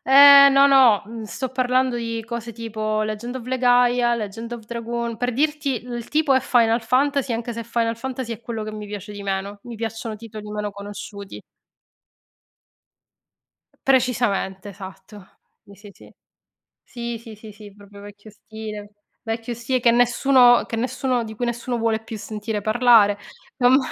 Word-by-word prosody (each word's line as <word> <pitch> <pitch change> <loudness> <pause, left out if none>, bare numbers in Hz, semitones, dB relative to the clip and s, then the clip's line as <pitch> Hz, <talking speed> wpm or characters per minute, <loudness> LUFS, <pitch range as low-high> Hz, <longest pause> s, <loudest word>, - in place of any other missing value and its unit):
Eh, 280 0 +10
no, 275 +1 +6
no, 255 -7 +5
mhmm, 225 +1 -8
sto 255 +4 -4
parlando 255 0 +1
di 230 -1 -4
cose 235 0 -6
tipo 215 -1 -3
Legend 215 +4 -5
of 245 - -8
Legaia, 245 -1 +3
Legend 225 +1 -6
of 235 -2 -7
Dragoon, 235 0 -4
per 245 0 -1
dirti 295 -3 -1
il 240 -2 -6
tipo 300 -2 +2
è 265 - +4
Final 230 -2 +2
Fantasy, 270 +2 +1
anche 235 +1 -4
se 230 0 -5
Final 230 0 -1
Fantasy 255 0 -5
è 225 - -8
quello 230 -2 -5
che 215 - -6
mi 210 -1 -7
piace 205 0 -8
di 205 0 -8
meno. 195 +1 -3
Mi 240 -1 -8
piacciono 225 0 -5
titoli 215 -1 -10
meno 210 0 -3
conosciuti. 200 0 -9 2.3
P - - -31
precisamente, 235 -7 0
esatto. 190 +1 -12 0.4
Sì, 200 -2 -15
sì, 205 +1 -14
sì, - - -18 0.7
sì, 235 -1 -6
sì, 225 -1 -12
sì, 215 0 -12
sì, 205 -1 -14
proprio 205 0 -15
vecchio 205 +1 -13
stile, 210 -1 -9 0.3
vecchio 230 +1 -4
stile 240 +2 -2
che 235 - +4
nessuno 245 +1 +4
che 230 - -5
nessuno 250 0 -1
di 220 0 -8
cui 245 - -3
nessuno 240 +1 -3
vuole 225 -1 0
più 225 0 -8
sentire 210 0 -5
parlare. 215 -2 +4 0.4
A 245 - +4
me 260 +2 +6
230 Hz, 165 wpm, -22 LUFS, 215-245 Hz, 2.3 s, Eh